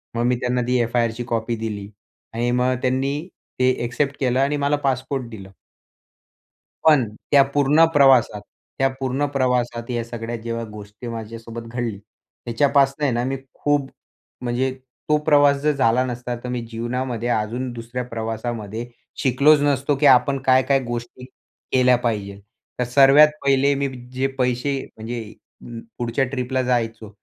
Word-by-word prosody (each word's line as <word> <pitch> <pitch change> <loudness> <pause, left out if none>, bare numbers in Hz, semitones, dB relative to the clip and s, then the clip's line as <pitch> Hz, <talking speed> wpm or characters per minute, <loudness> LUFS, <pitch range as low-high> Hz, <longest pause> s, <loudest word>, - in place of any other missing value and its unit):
मग 115 - 0
मी 125 0 +2
त्यांना 125 0 0
ती 125 0 +2
एफ-आय-आरची 120 0 0
कॉपी 115 +1 -1
दिली. 105 -3 -5 0.4
आणि 120 +1 0
मग 125 +1 +1
त्यांनी 135 +5 -1 0.3
ते 130 - +4
एक्सेप्ट 140 +4 -1
केलं 130 -1 +1
आणि 140 +2 +1
मला 145 +1 +1
पासपोर्ट 130 -1 -1
दिलं. 100 -4 -10 1.4
पण, 140 -8 +5 0.2
त्या 140 -1 +7
पूर्ण 145 +3 +5
प्रवासात. 130 -7 +4 0.4
त्या 135 - +3
पूर्ण 135 +2 -1
प्रवासात 125 -3 0
या 120 -1 -1
सगळ्या 115 0 -5
जेव्हा 115 0 -4
गोष्टी 105 +3 -10
माझ्यासोबत 115 0 -7
घडली. 120 -3 -3 0.5
ह्याच्यापासून 140 +4 +2
आहे 140 - +2
ना 120 +1 0
मी 135 +1 -2 0.2
खूप, 145 -2 0 0.5
म्हणजे 125 +2 -1 0.4
तो 150 - +5
प्रवास 145 -2 +5
जर 150 0 +2
झाला 125 -2 +3
नसता 125 -1 -4
तर 125 - -5
मी 125 -1 -2
जीवनामध्ये 120 +1 -3
अजून 120 +3 -1
दुसऱ्या 120 +2 -5
प्रवासामध्ये, 115 0 -4 0.3
शिकलोच 140 +4 +4
नसतो, 140 0 +1
की 145 - 0
आपण 135 +1 +5
काय, 130 0 +5
काय 135 0 +2
गोष्टी, 120 +1 -6 0.5
केल्या 125 -1 +4
पाहिजे. 100 -4 -2 0.4
तर 125 - +2
सर्वात 135 +4 +7 0.2
पहिले 140 +1 +3
मी 140 0 0 0.3
जे 130 +1 0
पैसे 125 +2 0 0.2
म्हणजे, 115 +2 -5 0.4
अ, 120 -1 -8 0.2
पुढच्या 120 +3 0
ट्रिपला 130 -1 -1
जायचो, 115 -3 -1
125 Hz, 150 wpm, -22 LUFS, 115-135 Hz, 1.4 s, त्या